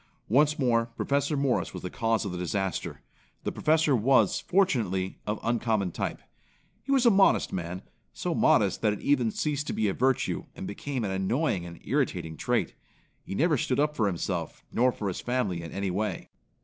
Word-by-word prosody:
Once 145 +6 +4
more 115 -4 +2
Professor 140 +2 0
Morris 135 -3 0
was - - -7
the 90 - -3
cause 115 -1 0
of 100 - -3
the 90 - -4
disaster. 95 +1 -2 0.4
The - - -1
Professor 155 -2 +2
was, 130 +4 +3
fortunately, 110 - 0
of 105 0 -1
uncommon 115 -5 0
type. - - -4 0.6
He 275 - -5
was 265 -2 +4
a 235 - +7
modest 195 -1 +4
man 90 +1 -4 0.3
so - - -3
modest - - +3
that 105 -2 +2
it 105 - -7
even 130 -5 +2
ceased 150 +5 -2
to - - -2
be 110 - +1
a 95 - 0
virtue, 130 0 0
and - - -6
became 130 +5 -4
an 100 - -2
annoying 95 - 0
and 85 0 -10
irritating 80 -1 -1
trait. - - 0 0.5
He 95 - -6
never 155 - +3
stood 125 +2 0
up 150 +1 +1
for 110 -6 +2
himself, 85 -2 -3
nor 125 +2 +3
for 105 - -5
his 95 - -3
family 115 -9 -1
in 85 - -8
any 100 -1 -2
way. 105 +4 -3
115 Hz, 190 wpm, -28 LUFS, 95-140 Hz, 0.6 s, a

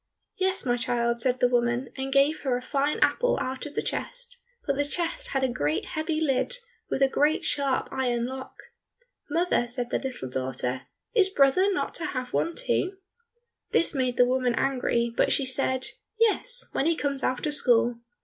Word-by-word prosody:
"Yes, 375 -3 0
my 245 -1 +2
child," 235 -1 0
said 255 +1 +1
the 250 - +5
woman, 240 +1 +1
and 270 0 -4
gave 280 +3 +3
her 255 -3 0
a - - -6
fine 285 +2 0
apple - - +3
out 260 +3 -3
of 290 - -12
the - - 0
chest, - - -5 0.3
but 280 - +1
the 290 - +1
chest 350 - -3
had 270 -1 -1
a - - +4
great 155 - -1
heavy 310 0 -2
lid 305 - +1 0.3
with 270 - +1
a - - +6
great 295 +3 +1
sharp 275 -2 +1
iron 245 -3 0
lock. 260 +1 -7 0.7
"Mother," 330 -6 +1
said 245 0 -4
the - - +1
little 260 - -5
daughter, 130 -1 -3 0.3
"is 395 -5 +5
brother 365 +4 +4
not 380 - -1
to 330 - -3
have 255 -1 -4
one 335 0 0
too?" 385 -6 -1 0.8
This 335 - +3
made 255 -3 0
the 245 - +6
woman 250 -1 +1
angry, 235 -3 0
but - - +2
she 275 - +2
said, 260 0 -1 0.3
"Yes, 480 +2 +2
when 275 - 0
he 335 - +3
comes 280 -2 -2
out 255 +3 -1
of 300 - -1
school." 240 -4 +2
265 Hz, 190 wpm, -27 LUFS, 245-315 Hz, 0.8 s, a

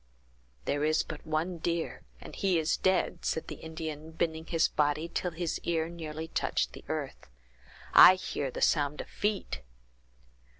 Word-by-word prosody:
"There 145 +1 0
is 155 +1 +3
but 155 0 -9
one 165 +3 -1
deer, 170 0 -2 0.2
and - - -10
he 190 -3 +2
is 160 0 +2
dead," 190 0 +1
said 160 - -1
the - - -6
Indian, 160 -1 -6
bending 160 0 -2
his 165 -1 +3
body 150 +2 +1
till 180 +1 -2
his 165 0 -3
ear 165 -1 -1
nearly 160 -2 -6
touched - - 0
the - - -10
earth. - - -4 0.6
"I 185 - +10
hear 145 -6 -3
the - - -3
sounds 145 -1 +2
of - - -10
feet!" 205 - -2
160 Hz, 160 wpm, -30 LUFS, 155-170 Hz, 0.6 s, I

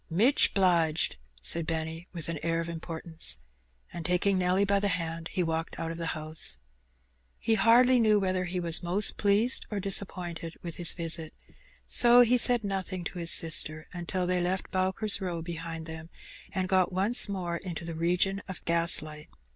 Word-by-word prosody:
"Mich 220 - +2
'bliged," 170 - +1 0.3
said 165 - +1
Benny, 160 +1 -5
with 170 -4 -5
an 165 -2 -4
air 165 0 -2
of 165 - -3
importance^ 165 - -3 0.6
And 170 - -7
taking 180 +4 0
Nelly 185 +2 +1
by 200 0 +1
the 205 - -1
hand, 165 -2 -4
he 180 - -1
walked 165 0 -4
out 165 0 -4
of 165 - -8
the 165 - -4
house 155 - +2 0.8
He 225 - -1
hardly 245 +3 +4
knew 215 -2 +3
whether 185 -1 -2
he 180 +1 -4
was 170 -2 +2
most 185 +4 +2
pleased 210 +5 0
or 210 - -4
dis^ 195 +1 +3
appointed 170 -4 -8
with 170 -2 -7
his 175 -1 +2
visit, 165 -2 -1 0.5
so 240 0 +6
he 245 +1 +3
said 240 -1 +4
nothing 190 -2 -5
to 175 - -7
his 170 -1 +5
sister* 155 -1 +3
until 180 +1 -4
they 180 0 -1
had - - -1
left 185 +1 -4
Bowker's 190 +3 0
Row 175 -3 -5
behind 165 -1 -7
them, 160 0 -10 0.4
and 185 -1 -3
gofc 185 -1 +1
once 205 +5 +4
more 175 -3 -4
into 175 -2 -7
the 165 - -6
region 180 +4 -1
of 190 -1 -8
gaslight. 160 -2 +2
175 Hz, 180 wpm, -27 LUFS, 165-195 Hz, 0.8 s, so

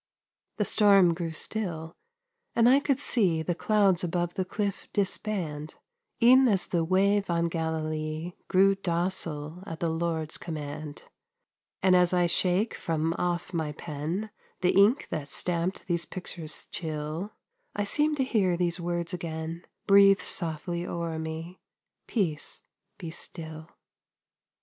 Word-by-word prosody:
The 210 - +1
storm 195 -3 +5
grew 165 0 -3
still, 165 -1 -3 0.6
and 230 0 +5
I 265 +3 +6
could 275 -2 0
see 185 - +2
The 175 - 0
clouds 195 -1 +2
above 175 0 -1
the 190 - -1
cliff 200 +1 -3
disband, 185 -7 -2 0.5
E'en 260 +2 +7
as 200 -5 +2
the 170 -2 0
wave 195 +3 +2
on 170 0 +1
Galilee 160 0 -3
Grew 195 +1 +5
docile 170 -3 -2
at 165 -1 -6
the 165 -1 0
Lord's 160 -1 -2
command; 150 -2 -6 0.8
And 185 -1 +5
as 180 0 +4
I 180 -1 +3
shake 180 +5 +2
from 165 0 -1
off 175 +1 -2
my 160 -3 -2
pen 165 +8 -4 0.3
The 180 - +3
ink 205 +8 +4
that 155 -3 -3
stamped 175 +4 -1
these 170 -2 -1
pictures 170 -4 -4
chill, 155 +4 -4 0.4
I 205 - 0
seem 300 +8 +2
to 270 - +1
hear 195 -9 +1
those 175 0 0
words 175 +1 -2
again 165 -1 -5 0.2
Breathed 195 -1 +6
softly 170 0 -3
o'er 170 -2 -3
me, 160 +3 -6 0.5
"Peace, 170 -10 -1 0.3
be 170 -3 -6
still." 160 -1 -6
175 Hz, 135 wpm, -28 LUFS, 160-195 Hz, 0.8 s, E'en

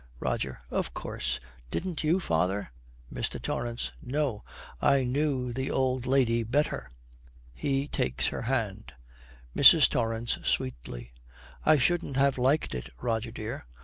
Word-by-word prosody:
ROGER. 65 +1 -2
'Of - - -2
course. 65 0 -3 0.3
Didn't 175 - -3
you, 165 +5 +3
father?' 90 - 0 0.4
MR. - - -2
TORRANCE. 120 - -3
'No! 135 -5 -1 0.4
I 140 -1 +4
knew 130 -1 0
the 130 +2 -2
old 130 -1 0
lady 125 -3 +3
better.' 130 +7 0 0.6
He 135 - -1
takes 65 - 0
her - - -4
hand. 110 -4 -2 0.6
MRS. - - +9
TORRANCE, 115 0 -1
sweetly, - - -2 0.5
'I 155 0 +7
shouldn't 145 0 +1
have 135 -1 +3
liked 135 +5 +2
it, 60 -1 -5
Rogie 115 -1 -1
dear. 110 - -6
120 Hz, 125 wpm, -29 LUFS, 105-135 Hz, 0.6 s, MRS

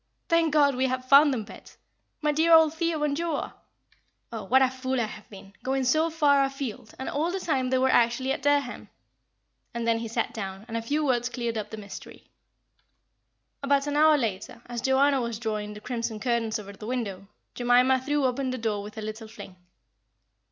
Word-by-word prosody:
"Thank 335 -1 +3
God, 285 -2 +4
we 260 +1 +1
have 255 0 -3
found 280 +2 +7
them, 240 -5 -2
Bet. - - -14 0.5
My 300 - +3
dear 320 +3 +2
old 320 -1 +6
Theo 325 -2 -1
and 290 -1 0
Joa! 330 -1 -3 0.8
Oh, 225 -3 -6
what 265 +6 +4
a - - +5
fool 260 0 -2
I - - +2
have 215 -1 -11
been, 195 -1 -13
going 265 0 -1
so 310 +6 +2
far 290 -4 +3
afield, 270 -5 -5
and 265 - -6
all 310 +4 -1
the 385 - -3
time 270 -8 -1
they 260 - +2
are 260 +1 +3
actually 240 +1 +2
at 275 - -2
Dereham;" 285 -2 0 0.9
and 235 -1 -2
then 230 0 +2
he 230 - -4
sat 230 +1 -2
down, 195 -1 -6
and 230 - -6
a 230 - -1
few 295 +6 -1
words 245 -2 +1
cleared 235 -1 -3
up 215 -2 -4
the 220 - -7
mystery. 205 -2 -10 1.4
About 280 0 +2
an 290 0 -2
hour 305 0 +5
later, 225 -1 -4
as 240 -1 -5
Joanna 270 +1 +3
was 235 -2 -3
drawing 210 -2 -4
the - - -8
crimson 230 -1 -4
curtains 235 -2 0
over 200 -1 -9
the 210 +2 -10
window, 200 -6 -4 0.3
Jemima 250 +2 +3
threw 290 +1 0
open 260 +1 -1
the 255 - -3
door 220 -3 -2
with 210 +2 -10
a 220 - -5
little 215 +1 -6
fling. 200 -3 -11
255 Hz, 200 wpm, -26 LUFS, 225-285 Hz, 1.4 s, found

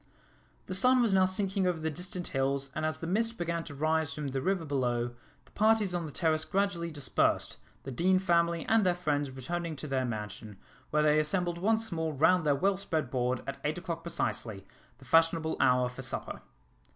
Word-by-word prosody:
The 185 - -5
sun 250 +7 +5
was 230 -5 +3
now 190 -1 +5
sinking 190 0 0
over 180 -2 0
the 160 0 -2
distant 180 +2 -4
hills, 135 0 -1
and 155 0 -1
as 155 0 -2
the 165 - -6
mist 225 +6 0
began 170 -1 -2
to 145 - -8
rise 155 +1 0
from 150 -3 -4
the 135 0 -2
river 185 +2 0
below, 120 -4 -1 0.3
the - - -24
parties 215 -3 +2
on 170 -2 -2
the - - -8
terrace 155 +1 +1
gradually 195 -4 -1
dispersed, 145 -4 0 0.3
the 135 - -6
Deane 185 +8 +3
family 170 -2 +1
and 225 -1 +3
their 180 -2 +2
friends 145 -5 -1
returning 165 +6 -4
to 150 - -7
their 135 -3 -1
mansion, 105 -2 -6 0.3
where 150 0 +2
they 150 0 +4
assembled 170 +2 0
once 220 +3 +1
more 160 -2 -2
round 160 +3 +3
their 145 - +4
well 195 +6 +1
spread 160 -9 -2
board, 125 -1 0
at 135 0 -5
eight 150 +3 -1
o'clock 170 -1 -4
precisely, 110 - -3 0.3
the 135 - -17
fashionable 165 +2 +3
hour 125 -1 +4
for 125 - -8
supper. - - -4
160 Hz, 200 wpm, -30 LUFS, 140-180 Hz, 0.3 s, sun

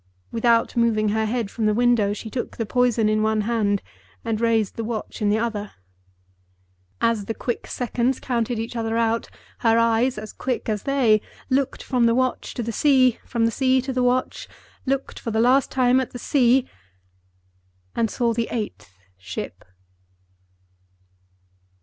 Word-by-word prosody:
Without 230 +1 +2
moving 225 -3 +2
her 220 +1 0
head 225 -3 -2
from 220 -2 -1
the 210 - +2
window, 240 -4 +3
she 215 +1 -6
took 250 - -4
the 225 - -1
poison 240 -1 +2
in 215 0 +2
one 220 0 +1
hand, 210 -3 0 0.4
and 225 -1 -1
raised 225 -3 +1
the 230 - -3
watch 220 0 -5
in 210 - +2
the 210 - +3
other. 220 -3 -3 1.3
As 225 -3 +1
the 225 - -4
quick 240 - -4
seconds 245 +1 -1
counted 240 -2 -1
each 225 +2 -4
other 225 -1 -1
out, 230 0 0 0.3
her 225 -1 +3
eyes, 230 +2 +2
as 215 0 -7
quick 255 -2 -3
as 210 -2 -1
they, 235 -6 +4 0.3
looked 270 0 0
from 250 -3 +1
the 230 - +3
watch 255 0 -1
to 240 - -2
the 230 - -3
sea, 255 -1 +3
from 230 -1 +1
the 230 - +2
sea 260 +1 +2
to 260 +1 -3
the 255 - 0
watch—looked 255 +2 -2
for 230 - -5
the 220 0 0
last 255 +4 +4
time 255 -1 +3
at 260 - -3
the - - -5
sea—and 95 - -2
saw 235 0 0
the 230 0 -1
EIGHTH 210 - -5 0.3
ship. 95 -1 -7
230 Hz, 160 wpm, -23 LUFS, 215-245 Hz, 1.3 s, they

